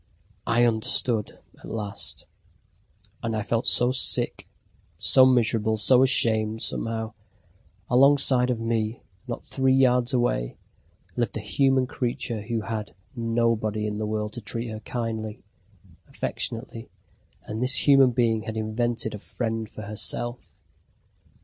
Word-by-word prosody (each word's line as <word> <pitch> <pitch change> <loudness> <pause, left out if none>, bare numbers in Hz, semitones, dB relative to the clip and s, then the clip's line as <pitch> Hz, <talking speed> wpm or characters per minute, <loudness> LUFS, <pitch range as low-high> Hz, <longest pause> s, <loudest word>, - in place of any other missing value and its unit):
I 120 +1 +3
understood 110 -1 +2 0.2
at - - -11
last. 105 -3 -5 1.0
And 115 -1 -2
I 110 - -2
felt 115 +3 -1
so 125 +1 +5
sick, 130 - +2 0.5
so 130 -1 +5
miserable, 110 -3 +2
so 125 +4 +4
ashamed, 110 -4 +2
somehow. 115 -1 -3 0.7
Alongside 130 -1 +4
of 120 -2 -1
me, 115 0 -2 0.2
not 120 - -6
three 130 -1 +1
yards 125 -1 +3
away, 120 - -1 0.6
lived 120 -3 -2
a - - -4
human 135 +4 +1
creature 120 -3 -3
who 115 +1 -3
had 105 -6 -5 0.2
nobody 115 -2 0
in 105 0 -3
the 110 - -2
world 105 0 -3
to 120 - -7
treat 115 +3 -4
her 110 -1 -6
kindly, 110 -2 -5 0.6
affectionately, 115 0 -4 0.5
and 110 - -6
this 130 +3 +2
human 135 -2 +6
being 115 -2 +1
had 110 +1 -6
invented 110 +1 -2
a 105 - -6
friend 110 0 -4
for 110 - -9
herself! 115 +3 -2
115 Hz, 130 wpm, -25 LUFS, 110-125 Hz, 1.0 s, human